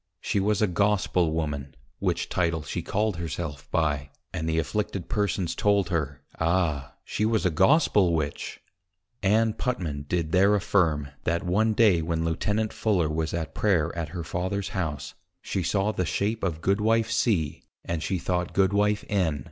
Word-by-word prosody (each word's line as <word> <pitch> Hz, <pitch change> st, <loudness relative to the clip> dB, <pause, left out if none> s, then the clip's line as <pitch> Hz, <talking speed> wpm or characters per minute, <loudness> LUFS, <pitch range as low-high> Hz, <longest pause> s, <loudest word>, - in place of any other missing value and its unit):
_ -, -, -55 dB, 0.2 s
She 100 Hz, -, 0 dB
was 105 Hz, +2 st, +1 dB
a -, -, +4 dB
Gospel 90 Hz, -2 st, +1 dB
Woman: 75 Hz, -4 st, -3 dB, 0.2 s
Which -, -, 0 dB
Title 85 Hz, -3 st, 0 dB
she -, -, -3 dB
called 105 Hz, -2 st, -1 dB
her 85 Hz, -1 st, -3 dB
self 75 Hz, -4 st, -5 dB
by; 75 Hz, -3 st, 0 dB, 0.2 s
and 80 Hz, 0 st, -2 dB
the 80 Hz, -, 0 dB
Afflicted 85 Hz, +4 st, -2 dB
Persons 100 Hz, -4 st, 0 dB
told 100 Hz, -4 st, +2 dB
her, 70 Hz, -5 st, -2 dB, 0.2 s
Ah! 80 Hz, -5 st, 0 dB
she -, -, -2 dB
was 110 Hz, -2 st, +1 dB
A 90 Hz, -, +3 dB
Gospel 95 Hz, -, +4 dB
Witch. 75 Hz, -2 st, -3 dB, 0.6 s
Ann 110 Hz, +2 st, +3 dB
Putman 80 Hz, -, -3 dB
did 85 Hz, -2 st, -1 dB
there 100 Hz, +3 st, +5 dB
affirm, 85 Hz, -8 st, +1 dB, 0.2 s
that 85 Hz, +3 st, 0 dB
one 105 Hz, +5 st, +2 dB
day 105 Hz, -7 st, +4 dB
when 80 Hz, 0 st, -1 dB
Lieutenant 105 Hz, +6 st, 0 dB
Fuller 95 Hz, -8 st, +1 dB
was 80 Hz, +1 st, -1 dB
at 80 Hz, -4 st, -3 dB
Prayer 85 Hz, -7 st, +1 dB
at 85 Hz, -2 st, -3 dB
her 85 Hz, 0 st, -5 dB
Father's 95 Hz, +4 st, -2 dB
House, 75 Hz, -6 st, -3 dB, 0.3 s
she 95 Hz, -, -3 dB
saw 100 Hz, +4 st, +1 dB
the 95 Hz, -3 st, -1 dB
shape 105 Hz, +6 st, -1 dB
of 85 Hz, -4 st, -1 dB
Goodwife 110 Hz, +4 st, +2 dB
C. 105 Hz, -9 st, +1 dB, 0.2 s
and 85 Hz, -2 st, -2 dB
she 95 Hz, -, -1 dB
thought 90 Hz, 0 st, -2 dB
Goodwife 100 Hz, +2 st, +2 dB
_N. 90 Hz, -8 st, +1 dB
90 Hz, 170 wpm, -26 LUFS, 80-105 Hz, 0.6 s, there